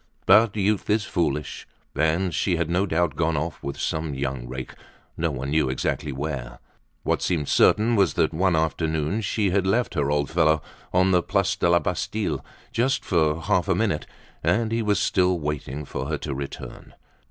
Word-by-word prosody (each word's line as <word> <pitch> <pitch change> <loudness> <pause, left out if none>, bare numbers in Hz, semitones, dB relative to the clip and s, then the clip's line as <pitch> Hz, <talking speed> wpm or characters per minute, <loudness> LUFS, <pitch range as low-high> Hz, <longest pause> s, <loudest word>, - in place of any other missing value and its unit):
But 110 -2 +5
youth 105 0 0
is 105 0 +2
foolish, 75 -7 -2 0.3
and 80 +5 +1
she 90 +2 +1
had 85 0 -1
no 95 +3 +1
doubt 85 0 0
gone 80 -2 +1
off 80 +1 -3
with 70 - -5
some 80 -2 -2
young 65 -2 -3
rake, 65 0 -6 0.4
no 85 0 0
one 70 -1 -4
knew 75 -3 +2
exactly 70 +3 -2
where. 65 -3 -5 0.5
What - - 0
seemed 80 -5 0
certain 115 +3 +4
was 100 -7 +3
that - - +2
one 90 +2 +2
afternoon 80 +4 0
she 100 -1 0
had 95 0 +1
left 115 +5 +1
her 75 -5 0
old 75 -1 0
fellow 80 -1 +3 0.3
on 95 +1 +3
the 90 -1 +4
Place 95 +1 0
de 85 - +1
la 85 - +5
Bastille, 90 -3 -2 0.3
just 130 +3 0
for 80 -2 +1
half 95 -2 +1
a 95 - +2
minute, 90 -6 0 0.4
and 115 -1 +1
he 115 0 +1
was 105 -2 +1
still 90 -2 +2
waiting 75 -1 -4
for - - -4
her - - -1
to - - -4
return. 70 +1 -8
85 Hz, 185 wpm, -24 LUFS, 75-95 Hz, 0.5 s, But